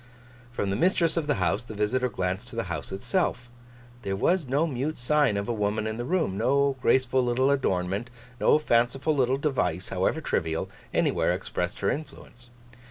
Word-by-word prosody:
From 100 -5 -2
the - - 0
mistress 170 - +2
of 165 -3 -1
the 145 - +2
house, 100 -3 0
the 110 -2 -9
visitor 125 +5 0
glanced 95 -3 -3
to - - -8
the - - -1
house - - -6
itself. 120 - -1 0.5
There 95 -3 -2
was 170 - +1
no 140 +6 +2
mute 145 +1 -2
sign 125 -3 +2
of 100 - -3
a 120 - 0
woman 105 0 -1
in 110 0 -3
the 120 - -3
room. 160 - 0
No 140 +1 +2
graceful 130 0 +3
little 125 +3 +2
adornment, 100 -4 0 0.3
no - - +5
fanciful 135 +2 +1
little 130 -1 +2
device, 130 - -1
however 95 +11 0
trivial, 80 - -2 0.2
anywhere - - +2
expressed - - -3
her - - +2
influence. 120 -5 -8
125 Hz, 175 wpm, -27 LUFS, 105-145 Hz, 0.5 s, no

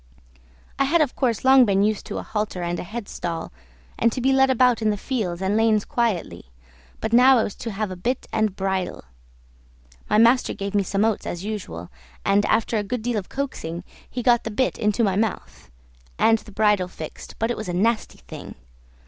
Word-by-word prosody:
I 275 - +4
had 330 +5 +3
of 295 - 0
course 245 -3 0
long 265 0 +8
been 200 -3 +2
used 215 0 0
to - - -4
a - - -4
halter 210 -4 -3
and 175 0 -2
a - - -4
headstall, 180 -5 -5 0.5
and 230 - +3
to 255 - -4
be 265 +2 +2
led 265 0 +4
about 250 -2 +3
in 220 - +2
the 210 - 0
fields 195 -7 -3
and 195 +2 +1
lanes 220 -2 +3
quietly, 190 - -1 0.5
but 220 - -3
now 255 +2 +7
I 225 - +3
was 205 - -4
to 235 - -5
have 205 0 -3
a - - -5
bit 235 +8 -2
and 215 -3 +1
bridle; 190 -1 -2 1.1
my 210 - +3
master 235 +3 +4
gave 200 0 -4
me 205 - +3
some 195 +2 0
oats 225 -2 -1
as 175 +2 -5
usual, 90 - -6 0.3
and 200 +1 +3
after 225 +1 +1
a - - -2
good 235 +2 -4
deal 235 -2 0
of 190 - -10
coaxing 180 -12 -4 0.3
he 245 - -4
got 240 -1 +4
the - - -3
bit 255 +5 -1
into 210 +1 +1
my 195 -3 +2
mouth, 215 0 -3 0.5
and 225 0 +4
the 210 - -14
bridle 205 -3 +2
fixed, 160 -3 -9
but 225 +2 0
it - - -1
was 215 -4 -5
a - - 0
nasty 220 +5 0
thing! - - -9
215 Hz, 210 wpm, -23 LUFS, 195-235 Hz, 1.1 s, long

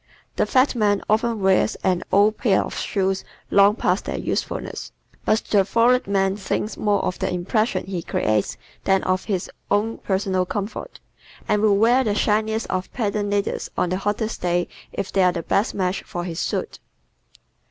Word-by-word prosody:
The - - +1
fat 260 +2 +3
man 205 -4 +1
often 225 0 +1
wears 190 0 +3
an 180 -2 +2
old 205 +2 +4
pair 200 -6 +3
of - - -7
shoes 195 -1 -1 0.3
long 200 +1 +6
past - - 0
their - - -3
usefulness, - - -3 0.3
but 215 +1 +2
the 200 -2 +5
florid 235 +5 +3
man 195 -1 +1
thinks 210 +2 -2
more 205 -1 +1
of 180 - -2
the - - -1
impression 195 +6 0
he 185 -2 -4
creates 110 -9 0 0.3
than 195 -1 +2
of 185 0 0
his 190 -5 -2 0.2
own 210 +3 0
personal 190 -2 0
comfort, 205 - -5 0.5
and 210 - +2
will 210 -2 +4
wear 240 +5 +4
the 210 -4 0
shiniest 220 +1 +1
of 185 0 -3
patent 205 -3 -1
leathers 200 0 -1
on 180 - +1
the 185 - 0
hottest 210 +2 -2
day 175 0 +1 0.2
if 200 -1 -4
they 195 - +2
are 180 -1 +4
the 170 -2 -4
best 200 +7 0
match 185 -1 -1
for 175 - -5
his 170 -2 -5
suit. - - -3
200 Hz, 175 wpm, -22 LUFS, 185-215 Hz, 0.5 s, long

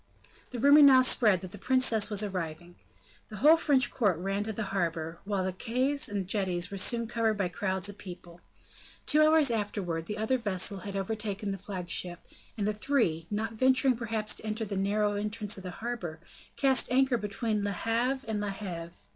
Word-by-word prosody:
The 250 - -6
rumor 285 +5 +6
now 265 -3 +8
spread 215 -7 +3
that 185 - -7
the 205 - -10
princess 235 -4 +2
was 210 -1 0
arriving. 175 -3 -5 0.6
The 215 - -8
whole 300 +9 +6
French 285 -6 +2
court 205 -9 +1
ran 195 +3 -2
to 220 - -3
the 220 +1 -4
harbor, 165 -3 -2
while 200 -2 -1
the 185 0 -2
quays 260 +8 +1
and 200 -3 -3
jetties 185 -3 -1
were 200 - -5
soon 235 +4 0
covered 225 -1 0
by 190 -3 -1
crowds 190 +1 -1
of 205 0 -7
people. 175 -2 -11 0.6
Two 305 - +4
hours 310 -3 +5
afterwards, 195 -7 -3
the 210 - -4
other 220 +4 0
vessels 195 -3 0
had 200 -1 -6
overtaken 205 0 -3
the 195 - -5
flagship, 180 -2 -4 0.4
and 205 - -1
the 210 - 0
three, 210 - 0
not 220 +2 -3
venturing 260 +2 +3
perhaps 225 -2 -1
to - - -5
enter 220 +1 -2
the 200 -1 -5
narrow 205 +2 0
entrance 210 0 -2
of - - -8
the 185 - -5
harbor, 180 -6 -6 0.4
cast 265 -3 +2
anchor 260 -1 +3
between 210 0 -2
Le 205 - -1
Havre 240 +6 -1
and 215 -2 -2
La 205 - -2
Heve. 175 -4 -6
210 Hz, 190 wpm, -29 LUFS, 190-235 Hz, 0.6 s, now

